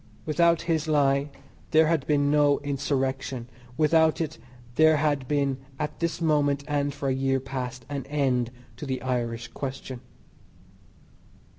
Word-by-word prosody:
Without 170 +1 +3
his 160 -2 0
lie 140 -1 +2 0.4
there 160 0 +5
had 160 -3 0
been 145 -1 +2
no 145 -1 +4
Insurrection; 135 -3 -2 0.3
without 160 0 +4
it 160 -2 -3 0.3
there 155 +3 +5
had 145 -3 0
been 140 -2 +1 0.2
at 150 +1 -4
this 170 -1 -1
moment, 145 -3 +2
and 145 -1 0
for 140 0 -4
a 135 - +2
year 135 0 +1
past, 130 -1 -5
an 140 -2 -5
end 130 -5 +1 0.3
to 150 - -6
the 130 -1 -2
"Irish 120 -2 -2
question." 130 -1 -6
145 Hz, 140 wpm, -26 LUFS, 135-155 Hz, 0.4 s, there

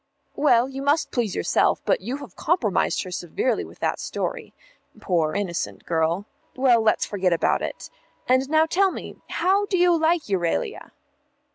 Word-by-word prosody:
"Well, 245 -4 +4
you 270 0 -6
must 290 +3 +1
please 230 -6 -1
yourself, - - +2
but - - +1
you 260 +3 -4
have 285 - -11
compromised 300 - 0
her 185 - -8
severely 180 +7 -1
with - - -13
that - - 0
story. - - -4 0.5
Poor 165 -4 0
innocent 190 -4 -3
girl. 165 +3 0 0.3
Well, 255 -3 +4
let's 220 -1 +2
forget 190 -3 0
about 165 - +1
it. - - -6 0.4
And 260 +2 +2
now 315 +1 +4
tell 380 +4 +2
me, - - -8
how 390 +4 +1
do 375 - 0
you 350 -1 +4
like 325 0 +2
Euralia?" 195 - -2
255 Hz, 160 wpm, -24 LUFS, -, 0.5 s, Well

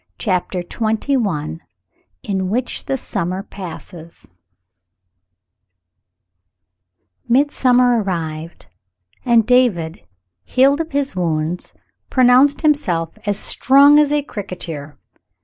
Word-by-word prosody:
CHAPTER 185 -3 -2
XXI 215 - -2 0.6
IN 190 -2 -2
WHICH 245 +5 -3
THE 270 - -1
SUMMER 190 -5 -3
PASSES 170 - -10 3.0
MiDSUAOiER 250 -2 +3
arrived, 165 -3 -5 0.6
and 235 -3 +3
David, 220 -11 +1 0.4
healed 275 +4 +3
of 325 - -6
his 280 -5 -1
wounds, 165 -1 -2 0.3
pronounced 255 +3 +4
himself 180 - 0
as 205 -1 +1
"strong 280 +6 +5
as 295 -1 +3
a 295 -1 +1
cricketer." 170 - -7
210 Hz, 85 wpm, -18 LUFS, 175-260 Hz, 3.0 s, strong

